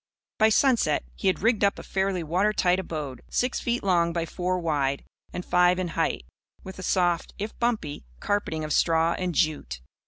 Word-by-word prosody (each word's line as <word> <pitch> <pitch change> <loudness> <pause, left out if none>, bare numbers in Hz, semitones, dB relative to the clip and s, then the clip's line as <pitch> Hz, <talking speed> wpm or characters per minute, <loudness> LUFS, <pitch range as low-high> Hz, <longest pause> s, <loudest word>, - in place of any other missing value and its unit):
By 220 0 +6
sunset 225 - +3
he - - -3
had 185 - +1
rigged 225 -2 +2
up 200 - +3
a - - -8
fairly 190 -2 -1
watertight 185 +2 +2
abode, 150 -7 -5
six 250 +1 0
feet 240 0 -1
long 170 -3 +2
by 170 -1 -1
four 180 +2 -2
wide 145 -5 -1 0.3
and 180 - -5
five 180 0 +4
in 185 -2 -2
height, 110 - -1 0.4
with 190 0 -9
a - - -5
soft, 175 -3 0
if 210 +2 -5
bumpy, 220 - -1 0.2
carpeting 180 -6 -1
of 155 -1 -2
straw 165 +1 +3
and 180 -2 -2
jute. 150 - 0
180 Hz, 180 wpm, -26 LUFS, 160-200 Hz, 0.4 s, By